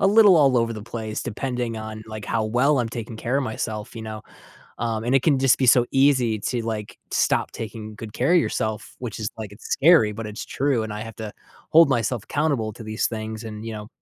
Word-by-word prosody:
a - - +4
little 205 -3 +7
all 135 -4 +5
over 115 0 +2
the 110 -2 -7
place 110 -1 -5
depending 120 0 -3
on, 110 0 -7
like, 110 -1 -7
how 110 -1 0
well 130 +6 +2
I'm 120 - 0
taking 115 -1 -6
care 125 +4 -1
of 140 - +1
myself, 110 -2 -4
you 110 - -6
know? 110 -1 -6 0.6
Um, 115 -1 -2
and 130 +3 +2
it 135 - +4
can 145 -4 +3
just 135 -2 +4
be 130 - +1
so 120 0 +6
easy 130 -5 +3
to, 120 +3 -2
like, 110 -2 -4
stop - - +1
taking 110 -1 -7
good 105 0 -8
care 130 +10 +1
of - - +7
yourself, 110 -8 -2
which 120 -4 -5
is, 110 -1 -2
like 105 -2 -7
it's 110 - -16
scary, 145 -7 +5
but 110 +1 -6
it's 105 +1 -6
true, 135 -5 0
and 110 - -5
I 105 - -5
have 115 -1 -8
to 110 -2 -5 0.4
hold 165 0 +7
myself 120 -3 0
accountable 135 -7 0
to 115 - -10
these 110 0 -1
things 110 0 -5
and, 110 0 -7
you 115 - -4
know, 105 -1 -7
115 Hz, 235 wpm, -24 LUFS, 110-130 Hz, 0.6 s, little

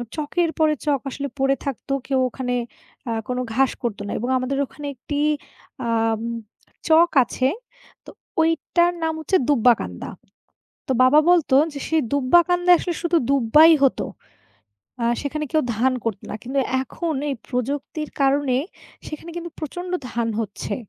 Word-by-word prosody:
"চকের 325 +3 0
পরে 310 -1 +4
চক 290 -2 +2
আসলে 280 +2 -4
পড়ে 270 0 +3
থাকতো, 275 0 -3
কেউ 270 -1 +1
ওখানে 250 0 -3 0.6
আ - - -1 0.2
কোনো 250 0 -2
ঘাস 265 +2 +3
করতো 220 -4 -2
না।" - - -4
এবং 240 +4 -3
আমাদের 255 +2 -2
ওখানে 290 +2 -9
একটি 285 +4 -4 0.7
আম 225 -1 +1 0.7
চক 330 +2 +6
আছে। 255 +2 -1 0.6
তো - - -11 0.3
ওইটার 330 +2 +2
নাম 320 0 0
হচ্ছে 345 +5 +2
'দুব্বাকান্দা।' 235 - +2 0.8
তো - - 0
বাবা 255 +4 +6
বলতো 335 -7 +3 0.2
যে, 285 - -6
"সে 320 - +1 0.2
দুব্বাকান্দায় 350 +6 +4
আসলে 350 - -3
শুধু 340 0 +1
দুব্বাই 280 +5 +6
হতো। 270 - +1 1.0
আ - - +1 0.2
সেখানে 300 +1 -3
কেউ 310 -1 +3
ধান 255 +4 +2
করতো 220 -4 -3
না।" - - -4
কিন্তু 265 +3 -3 0.2
এখন 320 +5 -4 0.2
এই - - -1
প্রযুক্তির 280 +4 -3
কারণে, 275 -1 +2 0.5
সেখানে 310 +2 -8
কিন্তু 345 0 -5
প্রচণ্ড 355 +4 -6 0.2
ধান 235 -1 -1
হচ্ছে। 210 -1 -4
280 Hz, 145 wpm, -22 LUFS, 250-320 Hz, 1.0 s, চক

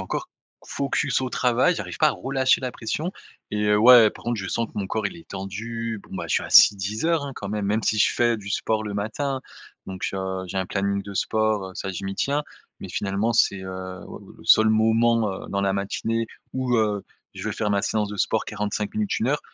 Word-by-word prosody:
encore - - -4 0.4
focus 140 0 0
au 130 - -2
travail, 125 +9 +2
j'arrive - - -5
pas 155 - +5
à - - +2
relâcher 130 0 +1
la 130 -1 -3
pression. 150 +9 -3 0.4
Et, 105 0 -1
heu, 105 0 +4
ouais, 115 -1 +8
par - - -15
contre 120 0 -1
je 95 -3 -4
sens 115 +4 -1
que - - -20
mon 100 - -2
corps 110 +2 -1
il 175 - -7
est 165 - -15
tendu, 115 +4 -5
bon - - -12
bah - - -4
je - - +1
suis - - +2
assis 105 - +7
10 100 +5 -3
heures, 165 -3 +2
hein, 140 - -5
quand 100 - -6
même, 105 0 -2
même 105 +2 +1
si 110 - +1
je - - +4
fais 120 -1 +2
du 100 -2 -9
sport 110 +2 0
le 105 -1 -5
matin. 130 +7 -2 0.5
Donc, 95 0 -4
heu, 95 -1 -3
j'ai 95 - -6
un 95 - -1
planning 100 +1 -1
de 100 0 -9
sport, 110 -1 0
heu, - - -15
ça, 95 - -4
je 95 +1 -6
m'y 95 0 -3
tiens. 140 +7 0 0.4
Mais - - -8
finalement, 100 +3 -1
c'est, 100 -3 +3
heu, 95 0 -6
oua - - -9 0.2
le - - -15
seul 110 0 +6
moment, 115 +1 +3 0.2
heu, - - -10
dans 100 - -1
la 100 0 +1
matinée 115 +4 -2 0.3
où, 130 -2 0
heu, 105 -3 +1 0.3
je - - -7
vais - - -3
faire 105 -1 -1
ma 100 -1 +2
séance 105 -1 0
de 105 - -6
sport 110 +2 0
45 105 0 -3
minutes, 215 -2 0
1 115 - +1
heure. 145 +2 +1
110 Hz, 240 wpm, -24 LUFS, 100-120 Hz, 0.5 s, ouais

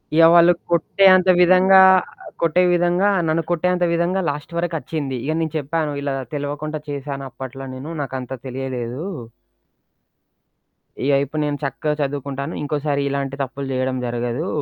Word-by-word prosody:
ఇగ 165 0 +7
వాళ్ళు 170 0 +7 0.2
కొట్టే 170 +4 +2
అంత 185 0 +2
విధంగా 185 +2 +6 0.2
ఆహ్, 185 - -6
కొట్టే 170 +2 +3
విధంగా 175 +3 +2 0.2
నన్ను 160 +1 +1
కొట్టేంత 180 +1 +1
విధంగా 175 +3 0
లాస్ట్ 145 +3 -6
వరకచ్చింది. 155 -5 -3
ఇగ 155 - 0
నేను 160 -2 -3
చెప్పాను. 155 +1 -2
ఇలా 140 -1 -2 0.2
తెలవకుండా 145 +1 -4
చేసాను 140 -1 -5
అప్పట్లో 135 +1 -8
నేను 140 +6 -7
నాకంత 130 -1 -5
తెలియలేదు. 130 +1 -5 2.0
ఇగ 140 - +2
ఇపుడు 150 +2 -4
నేను 145 -1 -2
చక్కగా 150 +3 -2
చదువుకుంటాను. 140 +1 -3
ఇంకోసారి 145 -1 -1
ఇలాంటి 140 -1 -3
తప్పులు 135 +1 -6
జేయడం 130 0 -1
జరగదు. 120 +6 -3
145 Hz, 135 wpm, -21 LUFS, 135-170 Hz, 2.0 s, ఇగ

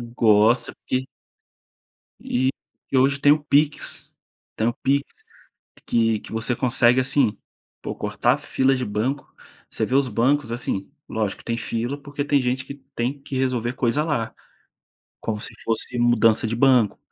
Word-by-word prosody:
Gosta 110 +2 +4
porque 130 0 -3 1.1
E 130 +1 0 0.4
e 135 - +2
hoje 135 +2 +3
tem 145 - +5
o 150 0 +2
PIX, 150 0 0 0.4
tem 110 - 0
o 120 - +1
PIX, 140 +3 +1 0.8
que 115 -2 +2
que - - -12
você 115 +2 -1
consegue, 125 0 +3
assim, 130 -4 +2 0.5
pô - - -4
cortar - - 0
fila 135 +1 +1
de 130 - -2
banco, 120 +6 -3 0.4
você - - -1
vê 130 - -2
os 135 0 +4
bancos, 125 +3 +1
assim, 115 -5 -3 0.2
lógico 110 -3 -2
que - - -16
tem 115 - -1
fila 120 +4 -3
porque 145 0 -4
tem 145 -1 +2
gente 130 +1 -1
que 140 - -7 0.2
tem 125 +4 -2
que 135 -1 -5
resolver 125 -2 0
coisa 130 +4 +1
lá, 130 -8 -2 0.9
como 110 -2 -3
se - - -6
fosse 115 +2 -2
mudança 120 -2 +3
de 115 - -2
banco. 125 -3 +3
125 Hz, 160 wpm, -23 LUFS, 115-135 Hz, 1.1 s, tem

